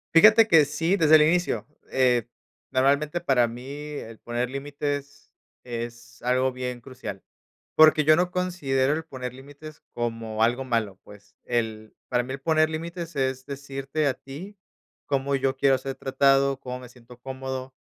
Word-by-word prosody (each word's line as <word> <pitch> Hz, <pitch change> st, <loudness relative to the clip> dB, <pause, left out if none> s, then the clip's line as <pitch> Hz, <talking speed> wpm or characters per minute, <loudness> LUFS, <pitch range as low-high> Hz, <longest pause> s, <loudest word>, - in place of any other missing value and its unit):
Fíjate 215 Hz, +5 st, +8 dB
que 160 Hz, -3 st, +7 dB
sí, 165 Hz, +6 st, 0 dB
desde 155 Hz, -3 st, +6 dB
el 155 Hz, -, +7 dB
inicio. 175 Hz, +3 st, +2 dB, 0.2 s
Eh, 125 Hz, -3 st, +2 dB, 0.4 s
normalmente, 145 Hz, +5 st, +1 dB
para 130 Hz, -7 st, +3 dB
mí, 120 Hz, +2 st, -8 dB
el 145 Hz, -6 st, -7 dB
poner 120 Hz, +1 st, -2 dB
límites 145 Hz, +1 st, -5 dB, 0.3 s
es 120 Hz, 0 st, -7 dB
algo 130 Hz, +1 st, +2 dB
bien 125 Hz, -1 st, -5 dB
crucial, 125 Hz, -7 st, -8 dB, 0.5 s
porque 155 Hz, -1 st, +6 dB
yo 155 Hz, +1 st, +7 dB
no 180 Hz, +2 st, +1 dB
considero 150 Hz, -7 st, 0 dB
el 160 Hz, +1 st, -2 dB
poner 130 Hz, -4 st, -6 dB
límites 145 Hz, +3 st, -12 dB
como 115 Hz, -2 st, -1 dB
algo 125 Hz, +3 st, +1 dB
malo, 115 Hz, -6 st, -1 dB
pues, 100 Hz, 0 st, -16 dB
el 110 Hz, -3 st, -2 dB, 0.2 s
para 125 Hz, -1 st, +1 dB
mí, 130 Hz, +2 st, -6 dB
el 135 Hz, -, -7 dB
poner 155 Hz, +1 st, +3 dB
límites 170 Hz, 0 st, -6 dB
es 130 Hz, -1 st, -1 dB
decirte 140 Hz, +1 st, -3 dB
a 135 Hz, -, +3 dB
ti 165 Hz, +12 st, -10 dB, 0.5 s
cómo 140 Hz, 0 st, 0 dB
yo 135 Hz, 0 st, 0 dB
quiero 135 Hz, -1 st, +4 dB
ser 135 Hz, +1 st, -5 dB
tratado, 135 Hz, 0 st, +2 dB
cómo 125 Hz, 0 st, -6 dB
me 125 Hz, -1 st, -11 dB
siento 125 Hz, 0 st, -16 dB
cómodo. 130 Hz, 0 st, -6 dB
135 Hz, 160 wpm, -25 LUFS, 125-150 Hz, 0.5 s, Fíjate